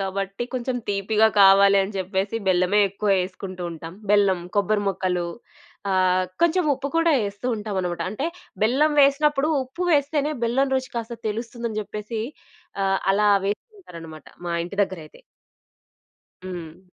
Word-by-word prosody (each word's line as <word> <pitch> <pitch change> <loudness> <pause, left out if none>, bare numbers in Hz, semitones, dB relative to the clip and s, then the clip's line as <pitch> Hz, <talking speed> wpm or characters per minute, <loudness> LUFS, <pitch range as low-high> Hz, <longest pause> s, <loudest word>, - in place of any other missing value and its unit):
గాబట్టి 195 +3 -3
కొంచెం 255 0 -2
తీపిగా 210 +2 +2
కావాలి 195 0 +7
అని 200 +2 -5
జెప్పేసి, 190 +3 -2
బెల్లమే 185 +3 +3
ఎక్కువ 200 +2 -4
యేసుకుంటూ 185 0 -6
ఉంటాం. 165 +1 -8 0.2
బెల్లం, 200 -3 +4 0.2
కొబ్బరి 205 +1 +2
మొక్కలు 180 -2 -1 0.6
ఆహ్, 185 -1 +3 0.2
కొంచెం 340 +1 +3
ఉప్పు 270 +1 -5
కూడా 330 -1 +4
యేస్తూ 205 +4 -5
ఉంటామనమాట. 190 -5 -3
అంటే, 240 +9 -3 0.4
బెల్లం 275 +8 +3
వేసినప్పుడు, 280 +1 +3 0.2
ఉప్పు 265 +8 -5
వేస్తేనే 295 0 +1
బెల్లం 265 +4 +1
రుచి 260 -1 -2
కాస్త 235 0 -4
తెలుస్తుందని 230 0 -4
జెప్పేసీ, 210 +2 -5 0.6
ఆహ్, 195 0 +2
అలా 210 +1 +3 0.2
వేస్తుంటారనమాట 180 - -7 0.2
మా 170 - -2
ఇంటి 180 +3 -8
దగ్గరైతే. 165 -5 -11 1.2
హ్మ్. 175 -2 -8
205 Hz, 125 wpm, -23 LUFS, 185-250 Hz, 1.2 s, కావాలి